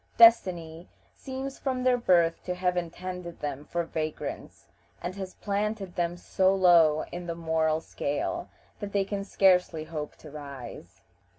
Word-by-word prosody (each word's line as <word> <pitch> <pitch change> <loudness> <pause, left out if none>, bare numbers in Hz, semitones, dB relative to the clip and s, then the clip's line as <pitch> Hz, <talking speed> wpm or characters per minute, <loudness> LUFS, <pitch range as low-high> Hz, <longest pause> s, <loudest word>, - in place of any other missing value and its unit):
Destiny 175 -8 +5 0.2
seems 265 0 -6
from 255 -2 -1
their 255 -1 +4
birth 175 -8 +3
to 180 - -2
have 180 0 0
intended 175 0 -5
them 145 -1 -4
for 170 +2 -1
vagrants, 155 -2 -5 0.3
and 175 +1 -4
has 190 -1 -7
planted 205 -2 -2
them 175 0 -1
so 190 +2 +2
low 170 -5 +5
in 175 0 -6
the 170 - -3
moral 160 -1 +1
scale 250 - -3 0.3
that 205 -1 -6
they 200 -1 +2
can 200 0 -3
scarcely 180 -5 +3
hope 155 -2 -6
to 155 - -13
rise. 135 - -9
175 Hz, 150 wpm, -28 LUFS, 160-195 Hz, 0.3 s, Destiny